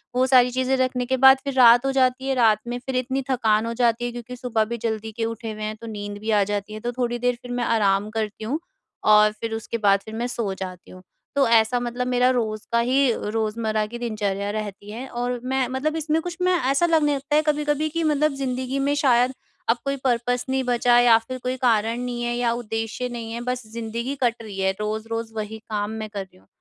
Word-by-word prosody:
वो 255 Hz, -, +3 dB
सारी 250 Hz, -1 st, +5 dB
चीज़ें 260 Hz, +1 st, +1 dB
रखने 255 Hz, -1 st, 0 dB
के 260 Hz, +1 st, 0 dB
बाद 265 Hz, +1 st, +8 dB
फिर 275 Hz, -1 st, -3 dB
रात 245 Hz, 0 st, +7 dB
हो 270 Hz, -, +2 dB
जाती 260 Hz, 0 st, +1 dB
है, 270 Hz, -, +1 dB
रात 220 Hz, -3 st, +4 dB
में 245 Hz, 0 st, -3 dB
फिर 265 Hz, -1 st, -3 dB
इतनी 260 Hz, +2 st, -1 dB
थकान 225 Hz, -4 st, +2 dB
हो 230 Hz, -, -3 dB
जाती 240 Hz, 0 st, +1 dB
है 240 Hz, -, -2 dB
क्योंकि 240 Hz, +1 st, -8 dB
सुबह 235 Hz, -3 st, 0 dB
भी 235 Hz, +2 st, -4 dB
जल्दी 220 Hz, -1 st, -3 dB
के 225 Hz, +1 st, -3 dB
उठे 225 Hz, 0 st, -5 dB
हुए 215 Hz, 0 st, -7 dB
हैं, 215 Hz, 0 st, -3 dB
तो 230 Hz, +1 st, -11 dB
नींद 205 Hz, -1 st, -6 dB
भी 220 Hz, +1 st, -2 dB
आ 205 Hz, -1 st, +4 dB
जाती 205 Hz, +1 st, -3 dB
है। 215 Hz, -, -6 dB
तो 240 Hz, +2 st, -3 dB
थोड़ी 240 Hz, -1 st, -2 dB
देर 245 Hz, 0 st, +1 dB
फिर 245 Hz, -, -9 dB
मैं 245 Hz, 0 st, -1 dB
आराम 205 Hz, -2 st, +2 dB
करती 215 Hz, -1 st, -3 dB
हूँ, 275 Hz, +8 st, -2 dB, 0.4 s
और 210 Hz, 0 st, +6 dB
फिर 225 Hz, +1 st, -6 dB
उस -, -, -1 dB
उसके 230 Hz, -, -3 dB
बाद 200 Hz, -2 st, +3 dB
फिर 220 Hz, -, -9 dB
मैं 240 Hz, +2 st, -2 dB
सो 220 Hz, -5 st, -3 dB
जाती 185 Hz, -2 st, -8 dB
हूँ। 185 Hz, -, -12 dB, 0.3 s
तो 275 Hz, -2 st, +4 dB
ऐसा 230 Hz, +1 st, +4 dB
मतलब 245 Hz, +1 st, -3 dB
मेरा 250 Hz, 0 st, +3 dB
रोज़ 220 Hz, -4 st, -1 dB
का 235 Hz, -, +3 dB
ही 255 Hz, +2 st, +3 dB, 0.2 s
रोज़मर्रा 220 Hz, -1 st, -1 dB
की 240 Hz, -, -7 dB
दिनचर्या 205 Hz, -4 st, -2 dB
रहती 205 Hz, -1 st, -6 dB
है 245 Hz, +5 st, -6 dB
और 245 Hz, 0 st, -2 dB
मैं 260 Hz, -1 st, 0 dB
मतलब 275 Hz, +5 st, -2 dB
इसमें 315 Hz, +1 st, 0 dB
कुछ 350 Hz, -1 st, -6 dB
मैं 365 Hz, 0 st, +3 dB, 0.2 s
ऐसा 280 Hz, +5 st, +3 dB
लगने 310 Hz, -4 st, +3 dB
लगता 280 Hz, +2 st, -2 dB
है 305 Hz, -, +5 dB
कभी-कभी 300 Hz, 0 st, +1 dB
कि 330 Hz, +2 st, -2 dB
मतलब 305 Hz, -1 st, +2 dB
ज़िंदगी 260 Hz, 0 st, -2 dB
में 280 Hz, +1 st, +1 dB
शायद 255 Hz, -2 st, +3 dB, 0.4 s
अब 230 Hz, -, +4 dB
कोई 275 Hz, 0 st, 0 dB
पर्पस 245 Hz, -1 st, 0 dB
नहीं 265 Hz, 0 st, +1 dB
बचा 245 Hz, -1 st, +3 dB
या 235 Hz, -2 st, +6 dB
फिर 255 Hz, 0 st, -4 dB
कोई 255 Hz, +1 st, -1 dB
कारण 230 Hz, -1 st, +1 dB
नहीं 245 Hz, -1 st, -3 dB
है 240 Hz, 0 st, -1 dB
या 240 Hz, -1 st, +1 dB
उद्देश्य 225 Hz, +1 st, -3 dB
नहीं 230 Hz, -2 st, -6 dB
है, 235 Hz, -, -4 dB
बस 250 Hz, +1 st, -3 dB
ज़िंदगी 235 Hz, +4 st, -4 dB
कट 235 Hz, -1 st, +2 dB
रही 210 Hz, -3 st, -8 dB
है, 190 Hz, 0 st, +2 dB
रोज़-रोज़ 225 Hz, +1 st, -3 dB
वही 220 Hz, 0 st, -5 dB
काम 210 Hz, -1 st, -2 dB
मैं 215 Hz, -, -5 dB
कर 200 Hz, -2 st, -5 dB
रही 190 Hz, -, -21 dB
हूँ। 95 Hz, -, -25 dB
240 Hz, 240 wpm, -23 LUFS, 220-255 Hz, 0.4 s, बाद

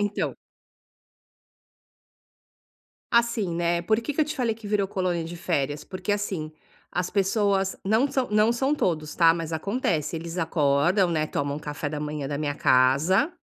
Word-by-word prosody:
Então. 205 Hz, 0 st, -1 dB, 2.8 s
Assim, 235 Hz, -6 st, +2 dB
né, 170 Hz, 0 st, 0 dB
por 215 Hz, +5 st, +2 dB
que 285 Hz, +5 st, -4 dB
que 310 Hz, -, +3 dB
eu -, -, +1 dB
te 305 Hz, +1 st, -4 dB
falei 240 Hz, -5 st, 0 dB
que 220 Hz, -1 st, -11 dB
virou 200 Hz, -1 st, 0 dB
colônia 180 Hz, -3 st, -1 dB
de 170 Hz, +2 st, -7 dB
férias? 145 Hz, -3 st, -2 dB
Porque, 185 Hz, +1 st, -5 dB
assim, 190 Hz, -6 st, -2 dB, 0.4 s
as 180 Hz, 0 st, -2 dB
pessoas 195 Hz, -1 st, +1 dB
não 225 Hz, +8 st, +2 dB
são 260 Hz, -2 st, 0 dB
não 215 Hz, +1 st, +4 dB
são 270 Hz, +5 st, +1 dB
todos, 155 Hz, -, -1 dB
tá, 165 Hz, -1 st, +5 dB
mas 165 Hz, -1 st, -5 dB
acontece: 165 Hz, -, -1 dB
eles 165 Hz, +2 st, -6 dB
acordam, 165 Hz, +3 st, +2 dB
né, 155 Hz, -2 st, 0 dB
tomam 145 Hz, 0 st, -2 dB
café 145 Hz, 0 st, -5 dB
da 150 Hz, -1 st, -4 dB
manhã 150 Hz, -1 st, -4 dB
da 140 Hz, +1 st, -3 dB
minha 145 Hz, -1 st, -1 dB
casa, 140 Hz, -, +3 dB
175 Hz, 160 wpm, -25 LUFS, 155-210 Hz, 2.8 s, tá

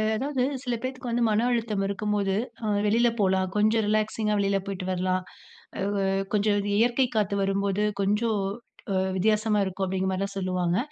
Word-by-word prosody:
அதாவது 265 Hz, +2 st, -1 dB, 0.2 s
சில 245 Hz, -2 st, -2 dB
பேத்துக்கு 255 Hz, -1 st, -4 dB
வந்து 240 Hz, +1 st, +1 dB
மன 215 Hz, +3 st, +2 dB
அழுத்தம் 225 Hz, -4 st, 0 dB
இருக்கும்போது. 200 Hz, -1 st, -1 dB, 0.3 s
ஆ -, -, -1 dB, 0.2 s
வெளில 235 Hz, +3 st, +4 dB
போலாம். 190 Hz, -1 st, +2 dB
கொஞ்சம் 215 Hz, +1 st, +3 dB
ரிலாக்ஸிங்கா 215 Hz, 0 st, +1 dB
வெளில 195 Hz, 0 st, +1 dB
போயிட்டு 190 Hz, -2 st, -4 dB
வரலாம். 185 Hz, 0 st, 0 dB, 0.6 s
அ. -, -, -2 dB, 0.5 s
கொஞ்சம் 205 Hz, 0 st, +2 dB
அந்த 205 Hz, 0 st, -2 dB
இயற்கை 245 Hz, +3 st, +3 dB
காத்து 205 Hz, -1 st, +1 dB
வரும்போது, 195 Hz, +1 st, 0 dB, 0.2 s
கொஞ்சம் 210 Hz, +1 st, +1 dB, 0.5 s
அ -, -, 0 dB, 0.2 s
வித்தியாசமா 215 Hz, +2 st, +2 dB
இருக்கும் 190 Hz, 0 st, -2 dB
அப்டிங்கிற 190 Hz, 0 st, -1 dB
மாரிதான் 195 Hz, +1 st, -3 dB
சொல்லுவாங்க. 185 Hz, -2 st, 0 dB
205 Hz, 155 wpm, -26 LUFS, 195-220 Hz, 0.6 s, வெளில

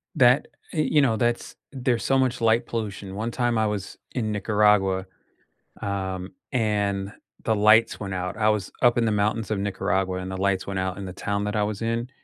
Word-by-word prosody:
That, 125 Hz, +2 st, +5 dB, 0.3 s
y 160 Hz, -, -2 dB
you 150 Hz, -1 st, +3 dB
know, 115 Hz, -5 st, +2 dB
that's 120 Hz, +1 st, -1 dB, 0.2 s
there's 125 Hz, -3 st, 0 dB
so 135 Hz, -, +2 dB
much 130 Hz, -1 st, +1 dB
light 115 Hz, +1 st, +3 dB
pollution. 100 Hz, -4 st, -4 dB
One 115 Hz, +3 st, -2 dB
time 120 Hz, -2 st, 0 dB
I 110 Hz, -, +2 dB
was 105 Hz, -2 st, -4 dB
in 110 Hz, -4 st, -2 dB
Nicaragua, 105 Hz, -2 st, +2 dB, 0.8 s
um, 95 Hz, -2 st, -3 dB, 0.2 s
and 105 Hz, -4 st, 0 dB, 0.3 s
the 110 Hz, -, +2 dB
lights 110 Hz, +2 st, +5 dB
went 95 Hz, -2 st, -4 dB
out. 90 Hz, 0 st, -3 dB
I 110 Hz, -1 st, +2 dB
was 105 Hz, -3 st, -1 dB
up 120 Hz, -1 st, +5 dB
in 115 Hz, -, +3 dB
the 110 Hz, -, +2 dB
mountains 105 Hz, +1 st, 0 dB
of 110 Hz, -, 0 dB
Nicaragua, 95 Hz, -1 st, -1 dB
and 95 Hz, 0 st, -5 dB
the 95 Hz, -, -4 dB
lights 95 Hz, 0 st, 0 dB
went 95 Hz, -1 st, -3 dB
out 95 Hz, +1 st, -2 dB
in 100 Hz, -, -5 dB
the 90 Hz, -, -6 dB
town 100 Hz, +2 st, -2 dB
that 105 Hz, +1 st, -2 dB
I 105 Hz, -, +2 dB
was 105 Hz, -1 st, -2 dB
in, 115 Hz, +2 st, -1 dB
105 Hz, 205 wpm, -25 LUFS, 95-115 Hz, 0.8 s, That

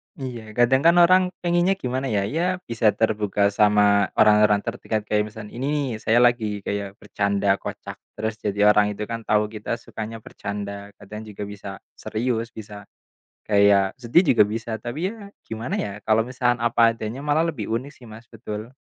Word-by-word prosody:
Iya, 130 Hz, -5 st, -6 dB, 0.2 s
kadang 130 Hz, +3 st, +4 dB
kan 170 Hz, +1 st, +6 dB
orang 185 Hz, +1 st, +5 dB, 0.2 s
pengennya 175 Hz, +2 st, +2 dB
gimana 130 Hz, +2 st, -2 dB
ya? 100 Hz, -, +1 dB
Ya, 170 Hz, -, +1 dB, 0.3 s
bisa 115 Hz, -1 st, +1 dB
terbuka 105 Hz, -2 st, +1 dB
sama 105 Hz, 0 st, +4 dB
orang-orang 105 Hz, -1 st, +4 dB
terdekat, 115 Hz, -2 st, -3 dB
kayak 105 Hz, 0 st, 0 dB
misalkan 110 Hz, -1 st, -10 dB
ini, 135 Hz, -2 st, -2 dB
saya 115 Hz, +2 st, +2 dB
lagi 110 Hz, -4 st, +1 dB
kayak 100 Hz, -1 st, -4 dB
bercanda 100 Hz, -1 st, -1 dB
kocak, -, -, -7 dB, 0.2 s
terus 110 Hz, +1 st, -2 dB
jadi 105 Hz, -1 st, -3 dB
orang 105 Hz, -1 st, +2 dB
itu 105 Hz, -, -5 dB
kan 115 Hz, -, -3 dB
tahu 105 Hz, 0 st, +3 dB
kita 110 Hz, +1 st, -4 dB
sukanya 110 Hz, +1 st, -7 dB
bercanda, 100 Hz, 0 st, -7 dB
kadang 105 Hz, +2 st, -9 dB
juga 105 Hz, -1 st, -7 dB
bisa 100 Hz, 0 st, -9 dB, 0.3 s
serius, 115 Hz, 0 st, -2 dB
bisa, 105 Hz, -2 st, -10 dB, 0.6 s
kayak 100 Hz, -2 st, +4 dB
sedih 120 Hz, +10 st, +4 dB
juga 105 Hz, -, +7 dB
bisa, 110 Hz, +2 st, -4 dB
tapi 120 Hz, +6 st, -5 dB
ya 205 Hz, -3 st, -11 dB, 0.2 s
gimana 115 Hz, +2 st, -4 dB
ya? 105 Hz, -, -3 dB
Kalau 110 Hz, 0 st, +3 dB
misalkan 125 Hz, -2 st, 0 dB
apa 115 Hz, 0 st, +4 dB
adanya 115 Hz, +5 st, -6 dB
malah 150 Hz, +3 st, +1 dB
lebih 110 Hz, -10 st, -5 dB
unik 130 Hz, +5 st, -3 dB
sih, 125 Hz, -, -15 dB
Mas, 110 Hz, +2 st, -12 dB
betul. 110 Hz, -1 st, -7 dB
110 Hz, 170 wpm, -23 LUFS, 105-120 Hz, 0.6 s, juga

